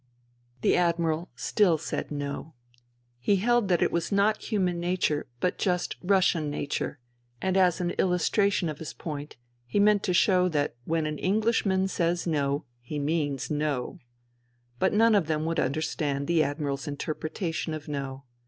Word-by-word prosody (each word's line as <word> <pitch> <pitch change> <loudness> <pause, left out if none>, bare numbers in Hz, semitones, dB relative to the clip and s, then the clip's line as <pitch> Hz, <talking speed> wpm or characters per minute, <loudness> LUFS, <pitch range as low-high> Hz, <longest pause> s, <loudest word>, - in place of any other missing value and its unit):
The - - +3
Admiral 170 -1 +1
still 170 +6 +2
said 155 - -4
No. 145 +1 -5 0.6
He 165 +12 +2
held 240 +2 +2
that 175 -3 +3
it - - +1
was 170 0 -1
not 205 +2 +2
human 185 -5 +1
nature 175 -4 0
but 180 - 0
just 180 -2 0
Russian 180 -5 +2
nature, 145 0 -3 0.4
and 190 +4 0
as 180 -3 +4
an 175 -1 0
illustration 185 +1 +2
of 150 -2 -5
his 160 - -6
point 150 -2 -6 0.3
he 205 - 0
meant 205 0 +5
to 185 - 0
show 180 -1 +4
that 145 -3 0
when 160 -1 0
an 150 -1 -3
Englishman 200 -2 +2
says 175 -2 0
No 145 -2 0 0.2
he 125 +5 -6
does 145 - -2
mean 150 -3 0 0.2
No. 145 -5 -2 0.8
But 190 - +3
none 225 +2 +5
of 195 -7 +3
them 155 -1 0
would 165 0 0
understand 140 0 -1
the 170 +1 +3
Admiral's 145 0 -2
interpre 150 +2 -4
tation 160 -2 -3
of 150 -2 -8
No. 140 -2 -4
165 Hz, 160 wpm, -27 LUFS, 150-185 Hz, 0.8 s, meant